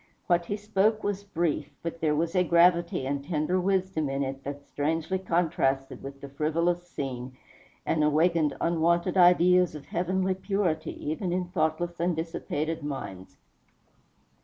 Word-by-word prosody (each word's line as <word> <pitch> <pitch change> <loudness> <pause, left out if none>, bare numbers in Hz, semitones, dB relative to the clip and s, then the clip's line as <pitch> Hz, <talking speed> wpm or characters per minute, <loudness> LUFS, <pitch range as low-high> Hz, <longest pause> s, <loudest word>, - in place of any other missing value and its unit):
What 175 -1 +2
he 205 - -2
spoke 215 +1 +1
was 200 -1 -2
brief; 170 -6 -1
but 165 0 -5
there 155 -2 +2
was 165 +3 -1
a 180 - +4
gravity 170 -3 +3
and 140 +1 -2
tender 160 +3 0
wisdom 185 -5 0
in 135 +1 -1
it 135 0 -5
that 140 0 -6
strangely 160 +5 -1
contrasted 160 -7 0
with 140 0 -9
the 140 - -7
frivolous 170 +5 0
scene, 130 -5 -5 0.5
and 155 -2 +1
awakened 155 0 +2
unwonted 170 +2 +1
ideas 180 -1 +5
of 145 - -9
heavenly 185 +2 0
purity 185 -6 -2
even 175 +3 -2
in 180 +1 0
thoughtless 170 0 -1
and 175 0 +1
dissipated 160 -1 -3
minds. 135 -10 -6
170 Hz, 145 wpm, -28 LUFS, 150-180 Hz, 0.5 s, ideas